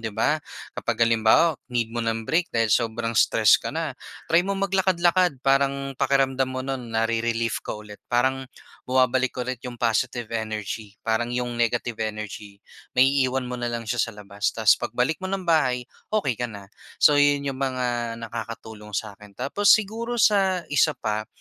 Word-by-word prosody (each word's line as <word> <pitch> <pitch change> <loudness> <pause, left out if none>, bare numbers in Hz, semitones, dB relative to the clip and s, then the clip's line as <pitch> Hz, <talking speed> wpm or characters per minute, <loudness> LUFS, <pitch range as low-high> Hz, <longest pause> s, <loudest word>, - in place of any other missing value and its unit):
'di 110 - -3
ba. 155 +1 +2 0.3
Kapag 115 0 0
halimbawa, 115 +8 +3
need 115 -2 -1
mo 120 - -2
ng 115 -1 -2
break 170 +6 +1
dahil 115 -2 +1
sobrang 115 0 0
stress - - +4
ka - - -4
na, - - -3 0.4
try 165 - +7
mo 195 +2 -2
maglakad-lakad. 180 -6 +2
Parang 135 0 +1
pakiramdam 135 -1 +2
mo 130 0 -4
no'n 125 -4 -5
nare-relief 115 0 0
ka - - -3
ulit, 105 -1 -11
parang 130 +2 +1 0.4
bumabalik 130 0 +2
ulit 130 0 -4
'yong 125 -2 -7
positive 120 0 -1
energy. 110 -2 -4
Parang 115 +1 0
'yong 120 0 -2
negative 120 0 0
energy 105 -1 -6 0.3
naiiwan 130 0 +3
mo 125 0 -5
na 120 - -2
lang 120 0 -3
siya 120 +2 -2
sa 115 -1 -1
labas, 100 -1 -3
tas 110 -2 +5
pagbalik 125 +7 -1
mo 190 - -4
ng 195 0 -2
bahay 130 -7 +2 0.2
okey 165 - 0
ka 120 - -1
na. 100 -2 -11 0.3
So, 145 -1 +7
'yon 145 0 +3
'yong 135 -1 -3
mga 125 -3 -2
nakakatulong 110 -2 -8
sa'kin. 105 -1 -6
Tapos 195 +11 0
siguro, 225 +3 -2
sa 195 -5 +3
isa 150 +1 +3
pa, 110 0 -3
120 Hz, 165 wpm, -24 LUFS, 115-140 Hz, 0.4 s, try